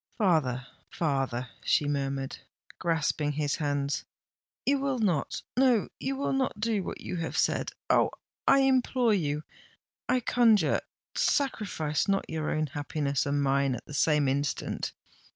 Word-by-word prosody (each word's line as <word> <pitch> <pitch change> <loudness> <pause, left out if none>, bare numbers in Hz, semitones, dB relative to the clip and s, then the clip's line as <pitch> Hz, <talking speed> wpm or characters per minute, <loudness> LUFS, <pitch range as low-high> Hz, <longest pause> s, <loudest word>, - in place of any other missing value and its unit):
"Father—father," 135 - 0 0.2
she 145 - +2
murmured, 135 -1 -2 0.4
grasping 160 -3 0
his 145 -1 0
hands; 145 -2 -1 0.6
"you 280 0 +3
will 275 -1 0
not—no, 225 - +1
you 270 +1 -2
will 275 0 -1
not 260 -5 0
do 215 -2 +1
what - - -6
you 180 - -4
have 165 -1 -3
said! - - +1 0.2
Oh! - - +4 0.4
I 275 - +6
implore 255 -3 +3
you—I 155 - -3
conjure—sacrifice 215 - +1
not 195 -1 +1
your 155 -1 -2
own 155 0 +1
happiness 145 -1 -2
and 145 0 +1
mine 135 -1 +2
at 120 - -9
the - - -10
same 150 0 +3
instant! 140 +2 -1
155 Hz, 125 wpm, -29 LUFS, 140-225 Hz, 0.6 s, I